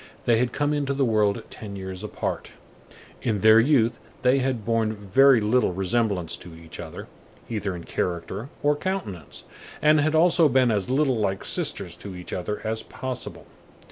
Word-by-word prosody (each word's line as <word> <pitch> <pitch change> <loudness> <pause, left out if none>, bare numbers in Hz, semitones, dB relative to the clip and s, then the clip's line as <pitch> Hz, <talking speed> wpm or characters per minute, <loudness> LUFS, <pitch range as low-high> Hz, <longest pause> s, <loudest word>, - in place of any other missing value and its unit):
They 115 -2 +4
had 125 0 +1
come 145 +3 0
into 140 -2 -1
the 135 -1 +2
world 105 -3 +1
ten 100 -2 -8
years 95 0 -6
apart. 105 - -4 0.7
In 110 -5 -1
their 110 +1 +7
youth 120 -2 +3 0.2
they 130 +2 +4
had 130 -5 -1
borne 115 -1 +1
very 115 +6 +4
little 110 -1 +2
resemblance 95 -2 0
to 85 -2 -11
each 80 0 -12
other, 80 -2 -7 0.5
either 105 -4 -2
in 85 - -8
character 90 +10 -3
or 145 0 +3
countenance, 145 - -4 0.4
and 155 0 +5
had 155 +2 +1
also 165 -1 +5
been 130 -2 +3
as 105 0 0
little 135 -1 +2
like 95 -3 -1
sisters - - -1
to 100 -2 -8
each 90 0 -8
other 105 +4 -3
as 110 0 -2
possible. 130 -2 -6
110 Hz, 170 wpm, -25 LUFS, 95-135 Hz, 0.7 s, their